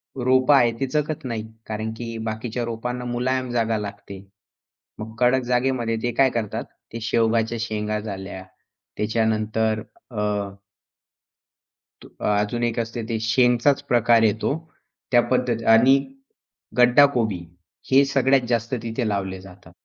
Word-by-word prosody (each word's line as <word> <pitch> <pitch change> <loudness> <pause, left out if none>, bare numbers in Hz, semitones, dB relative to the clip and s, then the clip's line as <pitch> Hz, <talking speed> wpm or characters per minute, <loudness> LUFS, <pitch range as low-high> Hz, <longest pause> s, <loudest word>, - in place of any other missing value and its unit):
रोपं 130 +2 +3
आहेत 120 -4 +4
ती 135 - 0
जगत 150 0 -2
नाही. 115 -3 -3 0.2
कारण 110 +1 -3
की 115 -1 -6
बाकीच्या 110 +2 -3
रोपांना 125 +2 -4
मुलायम 125 +1 -1
जागा 115 -2 0
लागते. 100 -1 -7 0.8
मग 110 +1 -7
कडक 125 +1 +3
जागेमध्ये 125 -2 0
ते 120 - -1
काय 135 -1 +5
करतात 110 -4 -2 0.3
ते 115 - -5
शेवगाच्या 115 0 +1
शेंगा 110 -1 -2
झाल्या. 95 -3 -7 0.5
त्याच्यानंतर 110 0 0 0.3
अ 110 -4 -4 1.8
तू - - -14 0.2
अजून 105 +3 0
एक 120 0 0
असते 115 +1 -3
ते 115 -1 -1
शेंगचाच 125 +4 +3
प्रकार 120 -1 +4
येतो. 110 +4 +1 0.6
त्या 120 -1 +6
पद्धत 125 -3 0
आणि 130 +5 +6 0.8
गड्डा 125 +3 +7
कोबी 110 -6 0 0.5
हे 135 +1 +7
सगळ्यात 135 -2 +2
जास्त 115 0 -1
तिथे 115 +1 -2
लावले 95 -2 -3
जातात. 95 0 -15
115 Hz, 130 wpm, -23 LUFS, 110-125 Hz, 1.8 s, गड्डा